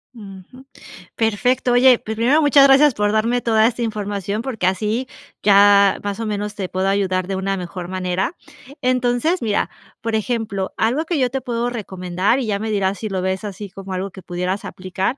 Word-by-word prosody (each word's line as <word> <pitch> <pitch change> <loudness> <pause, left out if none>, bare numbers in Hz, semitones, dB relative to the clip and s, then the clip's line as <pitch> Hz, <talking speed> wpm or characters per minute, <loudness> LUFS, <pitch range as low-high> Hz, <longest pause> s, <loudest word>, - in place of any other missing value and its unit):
Ujú. 205 +4 -12 0.5
Perfecto. 245 +3 +1
Oye, 250 0 +6
pues 220 - -5
primero 255 +8 +3
muchas 285 -1 +6
gracias 275 0 +6
por 210 0 0
darme 230 +3 +1
toda 220 -1 +3
esta 240 0 -3
información, 205 -1 -3
porque 240 -7 -3
así 215 +7 0 0.4
ya 200 -1 +5
más 205 +1 -4
o - - -2
menos 210 -1 -3
te 190 -3 -4
puedo 190 +1 -1
ayudar 185 -2 0
de 195 - -2
una 195 +1 -2
mejor 180 0 -6
manera. 185 - -2 0.5
Entonces, 255 +6 +1
mira, 215 -3 0 0.3
por 225 -1 -2
ejemplo, 220 -4 -2
algo 245 +8 +1
que 330 -3 -1
yo 255 -2 +2
te 270 +1 -3
puedo 240 -1 -2
recomendar 190 -1 -1
y 260 - -2
ya 205 -2 -1
me 220 +1 -3
dirás 200 -1 0
si 215 - -4
lo 190 -2 -2
ves 190 +2 -2
así 205 0 -7
como 195 +1 -10
algo 190 +1 -3
que 190 - -11
pudieras 180 +2 -3
aplicar, 185 +7 -3
210 Hz, 190 wpm, -20 LUFS, 190-245 Hz, 0.5 s, Oye